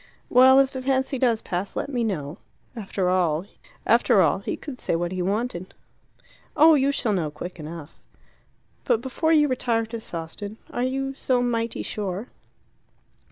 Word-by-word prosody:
"Well, 260 +2 +7
if 270 0 +3
the 260 - -4
fancy 265 0 0
does 235 -3 +2
pass, 185 +2 -4
let - - -2
me 250 -4 -1
know." 165 -7 -3 0.4
After 195 -4 -2
all, 175 -4 +2
he 205 - +1
could 270 -5 -8
say - - -1
what 175 +1 -2
he 185 -1 -3
wanted. 195 -1 -2 0.8
"Oh, 320 +2 +8
you 280 -1 +3
shall 240 -6 0
know 170 -6 0
quick 175 +4 -8
enough 155 0 -9 0.4
" - - -40
"But 225 - +2
before 275 +5 -1
you 300 -2 +5
retire 235 -3 0
to 225 +1 -6
Sawston 200 +3 -6
are 245 - -3
you 270 +2 -1
so 255 -2 0
mighty 230 -1 -1
sure?" 205 +2 -4
230 Hz, 160 wpm, -24 LUFS, 180-260 Hz, 0.8 s, Oh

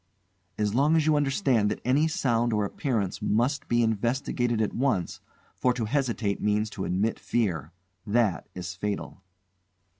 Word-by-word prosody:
"As 105 -1 0
long 145 +6 +3
as 160 -2 +3
you 155 -1 +4
understand 135 - +2
that - - -3
any 140 +5 +3
sound 120 -6 +1
or 105 -1 +1
appearance 105 -3 -2
must 125 +7 0
be 120 0 +2
investigated 120 +1 0
at 110 - 0
once, 125 -10 -1 0.3
for 125 -1 +1
to 120 -3 -1
hesitate 115 -5 -1
means 105 +1 +1
to 95 - -4
admit 100 +5 0
fear. 90 - -1 0.4
That 105 -3 +1
is 90 -2 -5
fatal." 100 +2 -4
115 Hz, 150 wpm, -27 LUFS, 105-130 Hz, 0.4 s, you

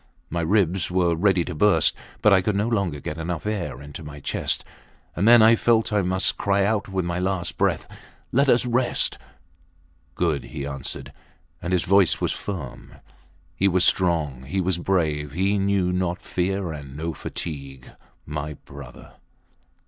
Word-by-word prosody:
My 85 +1 -1
ribs 95 0 +1
were 90 -2 +2
ready 90 0 +2
to 90 - -5
burst, 105 +6 +3 0.3
but 105 - +6
I 95 - +5
could 105 +2 -1
no 105 +3 +1
longer 100 -10 -1
get 75 - -6
enough 85 +1 -4
air 95 - -3
into 75 +3 -9
my 75 -1 -9
chest. - - -2 0.5
And 100 +5 +1
then 120 -1 +8
I 115 +1 +7
felt 115 -1 +2
I 105 - +3
must 95 +1 0
cry 100 -1 +2
out 105 -1 0
with 95 -2 -1
my 85 0 -2
last 90 -2 -2
breath, - - 0 0.4
Let 140 +2 +3
us 120 0 +4
rest!... 120 +1 +1 1.0
Good! - - 0
he 70 -3 -6
answered; 70 -1 -5 0.5
and 90 - -4
his 90 -2 +2
voice 100 -1 +4
was - - 0
firm. 90 -11 -6 0.6
He 100 - +2
was 90 -1 +3
strong. 80 -8 +2
He 95 +8 -2
was 90 -1 0
brave. 75 -6 0
He 100 +4 +1
knew 95 -2 +1
not 90 -1 -1
fear 90 0 -2
and 70 -3 -8
no 80 +1 -3
fatigue... 70 -4 -7 0.3
My 75 0 -4
brother! 70 -2 -12
90 Hz, 165 wpm, -24 LUFS, 75-100 Hz, 1.0 s, then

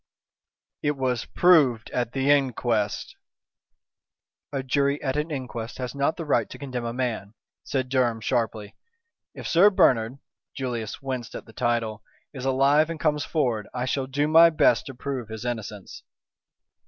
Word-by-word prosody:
"It 145 -1 0
was 125 -3 -1
proved 145 -11 +3
at 120 -1 -2
the 135 +1 +2
inquest." 120 -6 0 1.4
"A 135 -2 -2
jury 140 +2 +1
at 130 -1 -1
an 150 +2 -1
inquest 125 -5 -5
has 125 -1 -4
not 140 +2 0
the 165 - -5
right 150 - +1
to - - -9
condemn 125 -3 -5
a 115 - -2
man," 115 -4 -3 0.3
said 130 -2 -2
Durham, 125 -3 +1
sharply. 110 -3 -2 0.6
"If - - -6
Sir 185 +5 +6
Bernard" 125 - +3 0.4
Julius 120 -3 -4
winced 130 -3 -4
at - - -7
the 115 - -16
title 115 -2 -1 0.3
"is 130 -2 -6
alive 140 +4 +3
and 165 -1 -5
comes 150 -2 +1
forward, 120 -9 -1
I 125 0 -1
shall 130 +1 -1
do 145 +3 0
my 165 +2 +7
best 155 - +3
to 135 - -8
prove 130 -3 -5
his 110 +2 -7
innocence." 110 -5 -5
130 Hz, 155 wpm, -25 LUFS, 115-140 Hz, 1.4 s, my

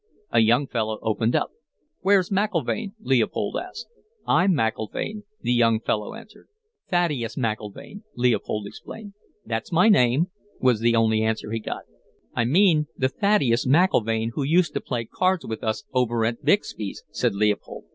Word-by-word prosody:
"A - - +4
young 120 +5 +4
fellow 110 -4 -2
opened 110 +1 0
up. - - 0 0.5
"'Where's 190 -1 +3
McIlvaine?' 200 - -1
Leopold 130 - 0
asked. - - -8 0.4
"'I'm 185 +2 +3
McIlvaine,' 135 - -2 0.2
the 120 - +1
young 115 -2 +3
fellow 105 -2 -2
answered. 220 - -14 0.4
"'Thaddeus 150 -11 0
McIlvaine,' 115 - -4
Leopold 120 -3 0
explained. 205 - -10 0.3
"'That's 115 -1 -4
my 180 +6 +5
name,' 145 - +3 0.3
was 125 -4 +3
the 115 +1 +2
only 110 -1 +3
answer 110 -1 -1
he 115 - -1
got. 105 - -5 0.5
"'I 120 - +1
mean 155 - +4
the 130 - +1
Thaddeus 135 - +2
McIlvaine 115 - +2
who 145 - -3
used 165 +3 +2
to - - -2
play 120 -3 -3
cards 185 +8 0
with 110 -1 -5
us 110 -1 -1
over 120 -3 +1
at 115 +1 -2
Bixby's,' 110 - 0
said - - 0
Leopold. 105 0 -1
120 Hz, 150 wpm, -24 LUFS, 110-175 Hz, 0.5 s, my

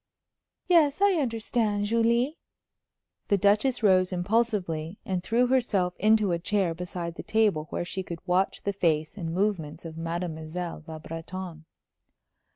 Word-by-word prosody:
"Yes, 320 -5 +4
I 400 0 +5
understand. 225 -4 0
Julie!" 235 +7 +1 0.9
The 200 - +3
Duchess 210 +6 +2
rose 185 -2 +4
impulsively, 185 -4 0
and 185 -2 -1
threw 235 +6 +2
herself 235 -8 +1
into 215 -1 +4
a 170 - 0
chair 195 -2 0
beside 175 0 -5
the - - -7
table 205 -9 +1
where - - -3
she 190 - -3
could 170 -2 -8
watch 185 +2 +1
the 200 - -1
face 160 -4 0
and 170 -5 -4
movements 175 -4 -1
of 160 -1 -7
Mademoiselle 165 0 -4
Le 160 -1 -7
Breton. 165 +1 -7
185 Hz, 140 wpm, -27 LUFS, 170-220 Hz, 0.9 s, I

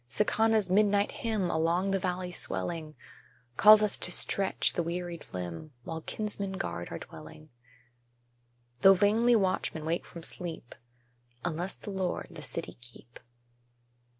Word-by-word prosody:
Sicána's 215 - +2
midnight 205 +1 +3
hymn, 215 -6 -1
Along 170 +4 +1
the 195 - +1
valley 180 0 -2
swelling, 155 - -3 0.6
Calls 215 - +8
us 210 - 0
to 175 - -1
stretch 195 +2 +1
the - - 0
wearied 175 0 -5
limb, 90 - -6
While 160 +3 -5
kinsmen 200 0 -3
guard 85 - -4
our - - -5
dwelling: 155 0 -12 1.3
Though 195 0 +8
vainly 220 +5 +4
watchmen 185 -6 0
wake 165 +2 -1
from 170 - -10
sleep, 165 -8 -6 0.7
"Unless 175 +2 -2
the 205 - -8
Lord 190 -2 -2
the - - -9
city - - -4
keep." 120 0 -11
180 Hz, 130 wpm, -30 LUFS, 160-200 Hz, 1.3 s, Calls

